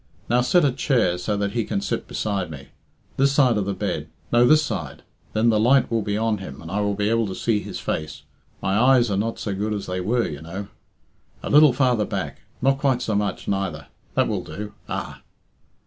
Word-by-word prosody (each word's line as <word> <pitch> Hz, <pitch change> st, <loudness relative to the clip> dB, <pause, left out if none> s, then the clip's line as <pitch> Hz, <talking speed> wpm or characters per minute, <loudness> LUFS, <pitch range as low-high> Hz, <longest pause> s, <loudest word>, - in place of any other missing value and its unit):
Now 120 Hz, +1 st, +3 dB
set 145 Hz, +7 st, +4 dB
a 140 Hz, -, +3 dB
chair, 120 Hz, -, +1 dB
so 105 Hz, +3 st, -1 dB
that 100 Hz, 0 st, -1 dB
he 115 Hz, 0 st, 0 dB
can 100 Hz, -, -2 dB
sit -, -, -3 dB
beside 100 Hz, -5 st, -2 dB
me. 70 Hz, -3 st, -10 dB, 0.5 s
This 135 Hz, +1 st, +3 dB
side 130 Hz, -4 st, +4 dB
of 105 Hz, -2 st, 0 dB
the 100 Hz, 0 st, -2 dB
bed -, -, -3 dB, 0.3 s
no, 120 Hz, +1 st, +6 dB
this 155 Hz, +2 st, +5 dB
side. -, -, -5 dB, 0.3 s
Then 110 Hz, +2 st, +3 dB
the 110 Hz, -2 st, +3 dB
light 125 Hz, +4 st, +4 dB
will 115 Hz, -1 st, +1 dB
be 100 Hz, 0 st, -2 dB
on 110 Hz, -1 st, 0 dB
him, 70 Hz, -8 st, -8 dB
and 85 Hz, 0 st, -9 dB
I 100 Hz, +1 st, 0 dB
will 100 Hz, 0 st, 0 dB
be 105 Hz, 0 st, 0 dB
able 115 Hz, 0 st, +2 dB
to 95 Hz, -, -5 dB
see 115 Hz, -3 st, +1 dB
his -, -, -6 dB
face 75 Hz, -3 st, -4 dB, 0.4 s
my 95 Hz, -, +1 dB
eyes 125 Hz, -2 st, +4 dB
are -, -, +1 dB
not 115 Hz, +3 st, -1 dB
so 100 Hz, -, -3 dB
good 105 Hz, +2 st, -2 dB
as 100 Hz, -, -4 dB
they 90 Hz, 0 st, -3 dB
were, 115 Hz, +6 st, +1 dB
you 75 Hz, -2 st, -7 dB
know. 95 Hz, +5 st, -7 dB, 0.7 s
A -, -, -3 dB
little 150 Hz, 0 st, +7 dB
farther 125 Hz, -4 st, +2 dB
back -, -, -4 dB, 0.2 s
not 135 Hz, 0 st, +3 dB
quite 135 Hz, -3 st, +1 dB
so 110 Hz, -, -1 dB
much, 100 Hz, 0 st, -1 dB
neither 90 Hz, -7 st, -2 dB, 0.3 s
that -, -, +3 dB
will -, -, -2 dB
do. 105 Hz, 0 st, -7 dB, 0.2 s
Ah!" -, -, -5 dB
105 Hz, 225 wpm, -23 LUFS, 100-125 Hz, 0.7 s, little